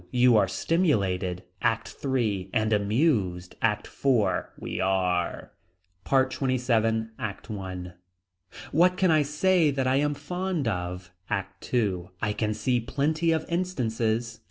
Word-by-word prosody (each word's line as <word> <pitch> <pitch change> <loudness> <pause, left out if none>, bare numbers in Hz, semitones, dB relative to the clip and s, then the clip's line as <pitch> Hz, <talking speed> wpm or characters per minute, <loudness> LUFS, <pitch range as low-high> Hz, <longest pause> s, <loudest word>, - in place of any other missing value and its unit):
You 125 -1 +4
are 100 -3 +4
stimulated. 95 - 0 0.2
ACT 115 -1 0
III. 110 -9 0
And 110 0 +2
amused. 100 - +1
ACT 105 -2 +1
IV. 115 -9 +1
We - - -4
are. 90 -2 0 0.5
PART 130 -1 +2
XXVII. 115 -4 +1
ACT 110 +2 -5
I. 95 -3 -5 0.8
What 180 +3 +4
can 185 -3 +3
I 155 -1 +5
say 155 +3 +3
that 135 -2 -1
I 130 +1 +3
am 145 +1 +1
fond 180 -3 -2
of. 90 -3 -3 0.2
ACT 95 -1 -4
II. 95 -7 0
I 105 -2 0
can 110 0 -1
see 120 +3 +1
plenty 155 +7 0
of 160 -1 0
instances. 120 -10 -1
115 Hz, 130 wpm, -27 LUFS, 100-140 Hz, 0.8 s, I